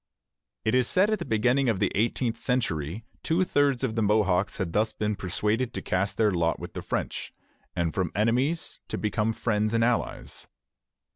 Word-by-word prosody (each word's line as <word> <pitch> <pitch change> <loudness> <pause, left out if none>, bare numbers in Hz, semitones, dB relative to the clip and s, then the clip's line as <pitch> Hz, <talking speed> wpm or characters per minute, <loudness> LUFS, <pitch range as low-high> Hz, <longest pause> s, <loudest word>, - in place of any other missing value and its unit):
It 110 - +2
is 125 -1 +3
said 190 +3 +3
that - - +2
at 215 - -1
the 170 - -4
beginning 125 +3 +2
of 105 -5 0
the - - +1
eighteenth 115 +2 0
century 105 - -1 0.2
two 170 +3 +2
thirds 140 -6 +2
of 125 -4 0
the 110 - 0
Mohawks 100 -3 +2
had 85 -4 -3
thus 110 +1 +1
been 105 0 -1
persuaded 105 +6 -1
to - - -3
cast 95 +2 -1
their 110 -2 +3
lot 85 -2 0
with - - -8
the - - -5
French, - - -3 0.4
and 85 -2 0
from 90 -4 -1
enemies 125 - 0
to - - -3
become 105 +1 0
friends 110 -1 0
and 115 - +3
allies. 120 0 -2
110 Hz, 190 wpm, -27 LUFS, 100-125 Hz, 0.4 s, is